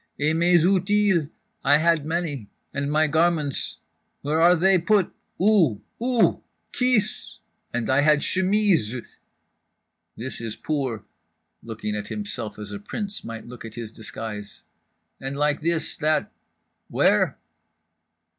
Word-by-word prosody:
"Et 150 +2 +2
mes 170 0 +4
outils, 190 -3 +2 0.3
I 145 +2 +5
had 160 -1 +2
many—and 145 -3 -4
my 155 +1 +3
garments—where 155 - -1
are 175 +2 +7
they 185 +2 +4
put, 195 +1 +2 0.3
où—où? 210 - +2 0.3
Kis! 250 -5 0 0.3
And 120 -1 -2
I 130 +2 +3
had 150 0 +4
chemises… 185 - +1 1.0
this 125 +1 -5
is 115 -2 -4
poor" 135 -8 -2 0.6
(looking 110 -2 -4
at 105 -1 -4
himself 130 - -4
as 105 -1 -7
a 100 - -5
prince 205 - -4
might 115 -1 -7
look 120 0 -10
at 115 -1 -9
his 115 -2 -6
disguise)—"and 110 +5 -9
like 150 +1 +1
this, 165 0 0
that—where?" 155 +1 0
150 Hz, 110 wpm, -24 LUFS, 115-180 Hz, 1.0 s, are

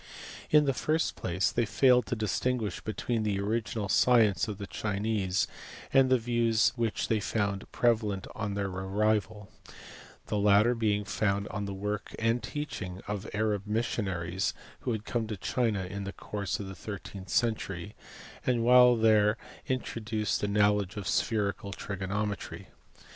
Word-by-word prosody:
In 150 -1 +6
the 135 - +2
first 155 +5 0
place 90 +2 0
they 120 - +1
failed 125 +2 +4
to 125 - -1
distinguish 110 0 -1
between 110 +1 -2
the 105 -2 0
original 105 0 -1
science 110 0 +4
of 105 -3 -4
the 100 - -5
Chinese 100 -2 -1 0.5
and 135 -1 +5
the 130 - +5
views 115 -1 +2
which 115 -3 -1
they 110 - +2
found 100 -1 -2
preva 120 -2 +3
lent 100 -3 -3
on 105 -2 -3
their 100 -1 -1
arrival; 105 +2 0 0.8
the 105 - -1
latter 105 +3 +5
being 105 -3 0
founded 100 0 -1
on 105 -1 -3
the 100 - -4
work 105 +1 -4
and 115 +2 +1
teaching 100 -11 -5
of 105 0 -4
Arab 105 -2 0
missionaries 95 -5 -1 0.2
who - - -2
had 110 -2 -3
come 115 -2 -1
to 105 -2 -4
China 110 -1 0
in 100 +2 -5
the 100 - -5
course 100 -3 -4
of 100 - -5
the 95 - -6
thirteenth 95 -1 -8
century, 100 -4 -1 0.5
and 120 -2 +1
while 125 0 +7
there 110 -1 +4 0.3
introduced 110 -4 -2
a 105 - 0
knowledge 105 0 +2
of 100 - -4
spherical 100 -2 0
trigonometry. 100 +1 -4
105 Hz, 155 wpm, -29 LUFS, 100-115 Hz, 0.8 s, while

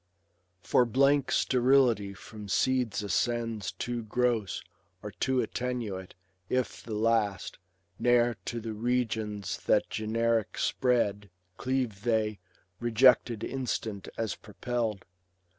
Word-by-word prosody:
For 125 - +4
blank 140 +4 +3
sterility 125 -6 +3
from 105 +1 -10
seeds 120 -2 +1
ascends 115 +1 -1
Too 120 -1 -3
gross, 115 -2 0 0.4
or 105 - -5
too 130 +5 0
attenuate; 115 -7 -4 0.3
if 130 -3 -1
the 110 -2 -5
last. 110 -2 0 0.4
Ne'er 120 -1 +3
to 120 - -3
the 115 -1 -5
regions 110 -3 -1
that - - +3
generic 115 0 0
spread 105 -6 +1 0.3
Cleave 125 -6 -1
they, 110 -3 0 0.4
rejected 120 -1 +4
instant 115 -6 -3
as 115 -2 -1
propelVd. 110 -1 -3
115 Hz, 105 wpm, -29 LUFS, 105-125 Hz, 0.4 s, For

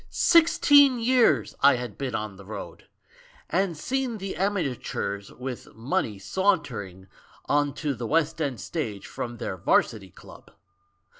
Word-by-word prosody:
Sixteen 290 -5 +5
years 230 - +3
I 140 0 +6
had 120 -4 -6
been 130 -4 -4
on 105 -2 -4
the 100 - -13
road 105 +3 -9 0.3
— - - -23 0.3
and 180 -1 0
seen 255 - -2
the 195 -1 -5
amateurs 135 - -2
with 125 -1 -8
money 115 - -2
sauntering 100 - -1 0.4
on 145 -1 +1
to 150 -3 -2
the 120 -2 -5
West 160 +2 +1
End 135 -7 -2
stage 110 - -4
from 120 -1 -6
their 95 - -4
Varsity 95 +2 +1
Club - - -15
140 Hz, 140 wpm, -26 LUFS, -, 0.4 s, I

